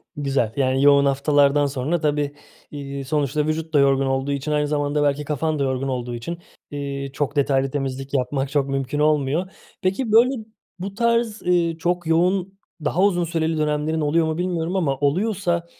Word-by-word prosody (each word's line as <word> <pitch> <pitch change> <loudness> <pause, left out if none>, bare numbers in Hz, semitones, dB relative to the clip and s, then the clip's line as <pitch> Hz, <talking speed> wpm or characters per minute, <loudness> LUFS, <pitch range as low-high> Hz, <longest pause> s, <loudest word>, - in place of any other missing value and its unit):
Güzel, 135 -6 0
yani, 135 0 +2
yoğun 140 0 +6
haftalardan 145 +1 +3
sonra 140 +5 -1
tabii, 145 -1 0 0.4
ııı, 140 -1 -5
sonuçta 150 +1 0
vücut 160 +1 -3
da 145 - +5
yorgun 135 0 +3
olduğu 135 +1 -1
için, 140 +2 -2
aynı 150 0 +1
zamanda 145 0 0
belki 145 +1 +1
kafan 155 +1 -1
da - - +1
yorgun 130 0 -1
olduğu 125 -2 -3
için, 165 +9 -5 0.3
iii, 140 -1 -4
çok 145 0 -2
detaylı 135 -2 +1
temizlik 135 -1 -4
yapmak 135 +1 -1
çok 140 -1 0
mümkün 135 +1 -2
olmuyor. 150 +4 +1 0.3
Peki, 210 +5 -1
böyle 235 +1 +4 0.4
bu 195 +2 -5
tarz, 235 -1 +1
ııı, 170 -2 +1
çok 175 0 -1
yoğun, 185 +4 +1 0.3
daha 165 +5 +1
uzun 175 -4 +3
süreli 165 -1 -1
dönemlerin 155 +1 0
oluyor 160 +3 +2
mu 160 0 -2
bilmiyorum 175 -1 -2
ama 145 -8 0
oluyorsa 175 +3 0
150 Hz, 170 wpm, -22 LUFS, 140-170 Hz, 0.4 s, yoğun